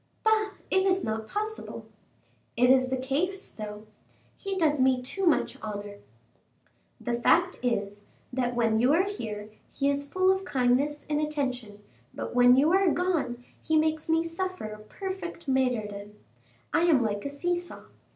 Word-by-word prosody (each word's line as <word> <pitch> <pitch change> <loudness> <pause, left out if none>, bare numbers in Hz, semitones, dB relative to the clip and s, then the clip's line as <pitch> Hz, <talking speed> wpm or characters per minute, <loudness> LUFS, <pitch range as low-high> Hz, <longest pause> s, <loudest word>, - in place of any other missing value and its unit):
"Bah! 435 -1 +2 0.2
it 380 0 +4
is 380 -1 +2
not 220 0 -3
possible." 430 - -4 0.7
"It 250 +1 +5
is 260 -1 +4
the 260 - 0
case, 315 +10 -2
though." 210 0 -8 0.5
"He 390 -1 -4
does 305 -5 +2
me 260 -1 +4
too 360 +10 -2
much 315 - +1
honor." 205 -1 -6 1.0
"The 240 - -3
fact 350 +7 +3
is, 205 -4 -2 0.3
that 245 -1 -1
when 225 -2 +2
you 250 +5 +4
are 345 +4 +4
here, 215 - -5 0.2
he 280 0 +1
is 285 0 -2
full 370 0 +4
of 380 0 0
kindness 275 +1 +1
and 300 0 0
attention, 255 -9 -3 0.3
but - - -5
when 245 0 +6
you 295 +4 +4
are 385 -1 +4
gone 300 -10 -1 0.2
he 315 - +1
makes 315 0 0
me 325 0 +3
suffer 370 -1 -4
a 215 - -9
perfect 345 - -7
martyrdom. 215 -6 -1 0.6
I 340 - +3
am 295 -8 +4
like 205 -2 -2
a 280 - -3
see 345 +5 -1
saw. 350 0 -7
280 Hz, 160 wpm, -28 LUFS, 240-350 Hz, 1.0 s, when